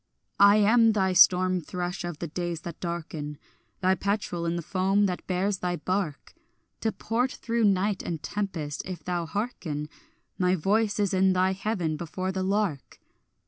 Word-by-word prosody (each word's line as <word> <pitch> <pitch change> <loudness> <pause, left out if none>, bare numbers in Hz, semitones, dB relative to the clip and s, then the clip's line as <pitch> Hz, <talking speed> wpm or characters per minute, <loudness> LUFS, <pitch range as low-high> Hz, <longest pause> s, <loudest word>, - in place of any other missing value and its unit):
I 200 +1 +8
am 225 +2 +5
thy 190 -3 +1
storm 185 0 +5
thrush 180 +3 -4
of 175 -3 -5
the 170 - -4
days 170 0 -4
that 170 -2 -8
darken, 160 -4 -5 0.4
Thy 185 0 +4
petrel 190 -4 -2
in 170 - 0
the 170 - -3
foam 195 +3 +2
that 180 -2 -3
bears 190 +1 0
thy 180 -1 -1
bark 175 -2 -3 0.5
To 220 - 0
port 245 +5 -1
through 230 -1 0
night 200 0 +2
and 165 -3 -5
tempest; 165 -8 -3
if 185 -1 -7
thou 175 -2 -2
hearken, 165 -8 -3 0.5
My 180 0 +3
voice 205 +5 +1
is 200 -2 +1
in 190 0 +4
thy 185 +1 +2
heaven 190 -5 -2
before 185 +3 -3
the 190 0 -3
lark. 195 -6 -1
185 Hz, 165 wpm, -27 LUFS, 170-200 Hz, 0.5 s, I